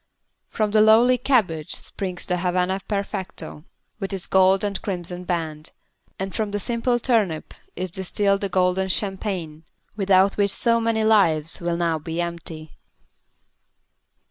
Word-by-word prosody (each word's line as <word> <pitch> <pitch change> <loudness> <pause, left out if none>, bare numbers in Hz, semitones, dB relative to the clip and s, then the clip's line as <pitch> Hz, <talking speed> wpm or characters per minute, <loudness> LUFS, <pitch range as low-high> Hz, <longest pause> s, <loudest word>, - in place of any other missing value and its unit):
From 215 -2 -1
the 215 0 +4
lowly 235 +4 +5
cabbage 195 - +1
springs 185 -3 -5
the 180 - -1
Havana 180 +2 0
Perfecto, 195 -6 -5 0.3
with 195 -1 -4
its 190 -2 -2
gold 190 +1 +4
and 200 -2 -2
crimson 180 -2 -3
band, 160 -3 -3 0.5
and 190 0 -4
from 215 -2 -1
the 205 - -2
simple 235 +3 0
turnip 220 -10 0 0.2
is 185 0 -4
distilled 200 +2 0
the 200 - -1
golden 185 +1 +1
champagne, 185 -4 -3 0.3
without 195 -1 +3
which 200 -1 +2
so 230 +3 +2
many 225 -1 +1
lives 170 -7 +2
will 170 0 -1
now 165 -2 0
be 165 +2 -5
empty. 165 -2 -5
190 Hz, 140 wpm, -23 LUFS, 175-210 Hz, 0.5 s, lowly